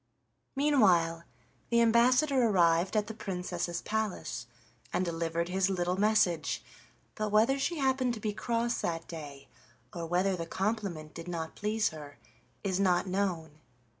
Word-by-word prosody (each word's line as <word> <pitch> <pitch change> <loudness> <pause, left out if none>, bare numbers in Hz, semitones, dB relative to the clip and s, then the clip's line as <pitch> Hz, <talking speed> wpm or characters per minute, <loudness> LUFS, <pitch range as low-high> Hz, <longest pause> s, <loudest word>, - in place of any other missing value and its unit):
Meanwhile, 185 - +3 0.4
the 235 - +3
ambassador 250 +3 +4
arrived 175 0 +3
at 210 - +2
the 220 - -6
Princess's 180 -4 -4
palace 170 - -3 0.4
and 185 - 0
delivered 170 0 -2
his 190 +1 +1
little 180 -1 0
message, 190 -6 +2 0.5
but 215 0 -2
whether 225 +6 +3
she 335 +5 -1
happened 260 -3 +1
to - - -8
be 210 -1 -2
cross 235 +2 -1
that 165 -1 -3
day, 145 -4 -9 0.5
or 170 -1 -4
whether 185 +3 +1
the 165 -2 -5
compliment 190 -6 -3
did 165 +1 -8
not 165 -2 -4
please 210 +1 0
her, 145 -2 -10 0.5
is 190 -2 0
not 185 -2 +3
known. 180 -5 -2
190 Hz, 140 wpm, -30 LUFS, 170-220 Hz, 0.5 s, ambassador